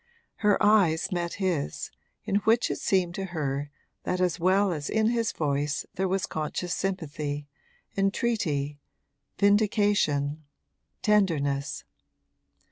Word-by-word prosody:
Her 210 -2 +3
eyes 190 -7 +4
met 175 -1 -2
his, 175 - -2 0.3
in 200 - +1
which 225 +3 +2
it - - -3
seemed 180 -3 +1
to 195 +2 -3
her 145 -5 -3 0.3
that 180 - -1
as 180 0 +1
well 190 +3 +3
as 150 -3 -3
in 220 0 +2
his 230 -1 0
voice 145 0 -1
there 190 +1 0
was 190 +1 0
conscious 160 +3 -3
sympathy, 150 -6 -3 0.5
entreaty, 195 - 0 0.6
vindication, 200 -8 +2 0.6
tenderness. 150 -10 +1
180 Hz, 115 wpm, -27 LUFS, 150-200 Hz, 0.6 s, eyes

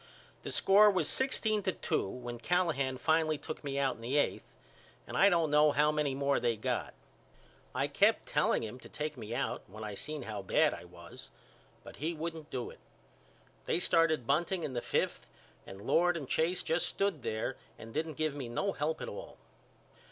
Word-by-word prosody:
The - - -6
score 205 +2 +6
was 185 -7 +2
sixteen 220 -5 +2
to 190 - 0
two - - -1
when 120 +1 -6
Callahan 140 -4 +1
finally 160 +1 +2
took 155 - -7
me 140 -1 -3
out 135 -2 +1
in - - -14
the 125 +5 0
eighth 145 - -1 0.5
and - - -7
I 200 - +6
don't 165 -4 +2
know 150 0 +6
how 150 +1 +3
many 150 -3 0
more 140 0 +1
they 120 -1 +1
got. 110 - -2 0.8
I - - +1
kept - - +3
telling - - +1
him 110 +3 -6
to - - -13
take 150 0 -4
me 115 -2 -6
out 140 - -2
when 110 +3 -9
I 105 -1 -5
seen 150 +7 -5
how 105 -3 -5
bad 95 - +3
I - - -8
was - - -12 0.5
but - - -11
he 165 +4 -2
wouldn't 160 -1 -5
do 125 -2 -4
it. - - -16 0.9
They - - +2
started 160 -7 +3
bunting 170 +6 +1
in 135 - -3
the 120 - -2
fifth - - -1 0.4
and 95 - -9
Lord 175 +4 +3
and 145 -5 -6
Chase 170 +6 +1
just 165 +2 +1
stood 195 -7 -1
there 110 +4 -2 0.2
and 115 0 -10
didn't 155 0 -2
give 155 -2 0
me 135 -4 -5
no 195 +12 -1
help 155 -1 -2
at - - -5
all. - - -8
150 Hz, 195 wpm, -32 LUFS, 125-165 Hz, 0.9 s, score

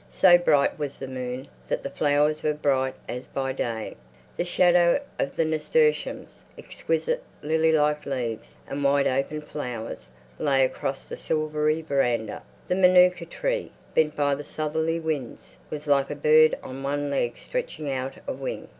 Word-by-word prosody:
So 180 -2 +6
bright 155 -5 +3
was 145 -2 -4
the 135 - -6
moon 130 0 -5 0.2
that - - -2
the - - -3
flowers 150 +1 +2
were 150 -1 0
bright 130 -3 +1
as 125 +1 -6
by 135 -1 -2
day; 115 -4 -3 0.4
the - - -1
shadow 175 +2 +4 0.2
of 140 - -1
the 165 - +2
nasturtiums, 455 - 0 0.2
exquisite - - -2 0.2
lily 160 +1 +2
like 150 -1 +1
leaves 120 -5 -4
and 140 +1 -4
wide 140 0 +3
open 135 +4 0
flowers, 125 - -6 0.3
lay 135 -3 +3
across 135 +1 -4
the - - -7
silvery 155 0 0
veranda. 120 -7 0 0.3
The - - +1
manuka 180 -1 +5
tree, - - -2 0.2
bent 150 -1 +2
by 145 -1 +2
the 145 +1 -4
southerly 160 +2 -2
winds, 155 -7 -5
was 150 -1 -6
like 140 -2 +2
a 145 - -3
bird 155 +2 +5
on 130 +1 -7
one 145 +1 -2
leg 120 -4 -1
stretching 485 - -4
out 130 0 -3
a - - -1
wing. 135 0 -5
150 Hz, 160 wpm, -25 LUFS, 135-160 Hz, 0.4 s, So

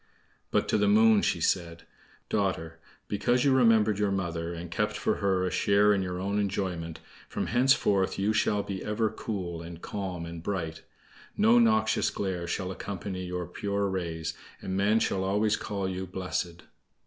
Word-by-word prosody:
But - - +1
to 110 - +2
the 105 - +3
Moon 110 +1 +6
she - - +1
said: 85 -2 0 0.4
"Daughter, 95 -5 -1 0.3
because 120 +5 +1
you 135 - +5
remembered 110 -5 +4
your 105 -1 +2
mother, 85 -3 -2
and 85 0 -7
kept - - -1
for - - 0
her 95 -2 +1
a 90 - -1
share 105 +1 +4
in 100 - +1
your 90 -1 -3
own 100 +2 -1
enjoyment, 90 -5 -2 0.3
from - - -2
henceforth 120 -6 +2
you 100 +2 +1
shall 105 -1 +1
be 95 -2 -5
ever 105 0 0
cool, 90 -7 -4
and 85 0 -9
calm, 90 -3 -5
and 85 0 -7
bright. 80 -4 -3 0.6
No 225 +3 +6
noxious 220 -2 +3
glare 90 -3 -3
shall 95 +2 -2
accompany 95 0 -5
your 90 0 -3
pure 100 +3 -2
rays, 85 -4 -3 0.3
and 95 - -4
men 105 +3 +3
shall 95 -3 0
always 105 +2 +2
call 100 -3 -3
you 95 0 -4
'blessed. 90 -1 -4
95 Hz, 170 wpm, -28 LUFS, 90-105 Hz, 0.6 s, Moon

